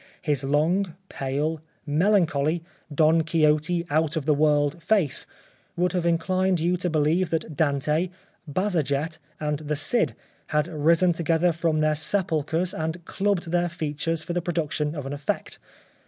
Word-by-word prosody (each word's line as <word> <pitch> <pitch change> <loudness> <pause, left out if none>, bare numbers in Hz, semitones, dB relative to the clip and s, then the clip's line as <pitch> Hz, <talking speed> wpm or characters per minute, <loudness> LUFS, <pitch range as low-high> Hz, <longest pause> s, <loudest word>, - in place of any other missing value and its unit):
His 145 -3 0
long 160 +6 +1
pale, 145 +4 -2 0.2
melancholy, 160 -1 +2 0.3
Don 155 +2 +4
Quixote, 155 +1 +2
out 160 +1 +1
of 150 - -2
the 150 - +4
world 145 +1 +2
face 185 -4 +1 0.5
would 180 +1 +2
have 175 -2 0
inclined 185 +2 +1
you 175 +3 +1
to 180 0 -1
believe 160 +3 +2
that 160 -2 -2
Dante, 150 +4 +1 0.4
Bajazet, 160 -4 -1 0.2
and 150 -1 -1
the 150 -1 -2
Cid 150 +12 +1 0.3
had 150 +1 +1
risen 165 +3 +3
together 165 +1 +2
from 160 -1 0
their 155 0 +3
sepulchres 165 +1 -1
and 160 +2 -4
clubbed 195 -4 -1
their 175 0 +1
features 165 -1 -2
for 175 - -4
the 175 - 0
production 155 -3 -2
of 145 -3 -5
an 135 - -4
effect. 145 0 -3
160 Hz, 145 wpm, -25 LUFS, 150-175 Hz, 0.5 s, Don